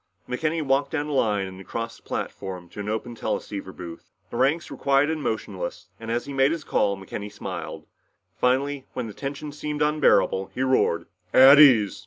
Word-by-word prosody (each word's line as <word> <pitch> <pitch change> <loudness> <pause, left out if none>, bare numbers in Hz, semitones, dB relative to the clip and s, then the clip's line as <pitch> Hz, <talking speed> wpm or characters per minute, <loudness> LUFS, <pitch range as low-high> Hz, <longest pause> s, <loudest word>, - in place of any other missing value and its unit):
McKenny 155 +5 -1
walked 135 0 +1
down 150 -2 -2
the 150 - -4
line 105 -7 +1
and 95 0 -9
across 115 +4 -5
the - - -22
platform 90 -2 -5
to - - -11
an 105 +1 -4
open 110 +2 -3
teleceiver 100 -4 -4
booth. 85 -3 -10 0.2
The - - -4
ranks 140 +6 +1
were - - -5
quiet 140 +2 +3
and 160 -1 -3
motionless, 105 -8 -4
and 115 0 -8
as 120 +1 -1
he 140 - -7
made 135 +1 +3
his 165 -2 -3
call, 100 -7 +1
McKenny 100 +2 -7
smiled. 105 - -6 0.5
Finally, 135 +4 0
when 125 - -3
the 110 - -7
tension 145 +4 -5
seemed 150 0 -3
unbearable, 150 -10 +3
he 130 - 0
roared, 105 -10 +2 0.3
"At 135 +2 +9
ease!" 115 -11 +6
125 Hz, 190 wpm, -25 LUFS, 105-145 Hz, 0.5 s, At